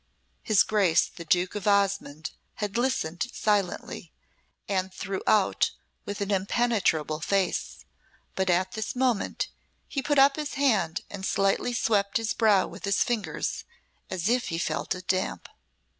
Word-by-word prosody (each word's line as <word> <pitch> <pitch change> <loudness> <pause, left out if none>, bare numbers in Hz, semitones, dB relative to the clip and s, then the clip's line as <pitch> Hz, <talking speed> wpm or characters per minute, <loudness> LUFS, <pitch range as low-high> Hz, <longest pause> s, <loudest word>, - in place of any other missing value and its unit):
'" - - -43
His 215 -3 +4
Grace 195 -6 +3
the 170 - -10
Duke 180 +3 +2
of 210 -1 -4
Osmonde 195 -7 +1 0.2
had 205 -2 -4
listened 235 -8 0
silently, 205 -4 -1 0.6
and 190 -1 -1
throughout 195 +2 +1 0.3
with 205 0 -5
an 200 0 -1
impenetrable 195 -6 +1
face, 195 +1 -1 0.5
but 190 -1 0
at 185 +1 +2
this 220 0 -4
moment 250 -4 0 0.4
he 275 - -2
put 290 +2 0
up 275 +1 +6
his 300 -1 -4
hand 220 - +2
and 200 -2 -7
slightly 195 +5 +1
swept 205 -4 +1
his 225 -1 -1
brow 210 -4 +4
with - - -8
his 200 0 +3
fingers, 230 -5 -2 0.5
as 185 -1 -2
if 245 +2 +2
he 165 - -2
felt 175 - -1
it 185 0 -10
damp. 185 0 -1
200 Hz, 145 wpm, -27 LUFS, 185-225 Hz, 0.6 s, up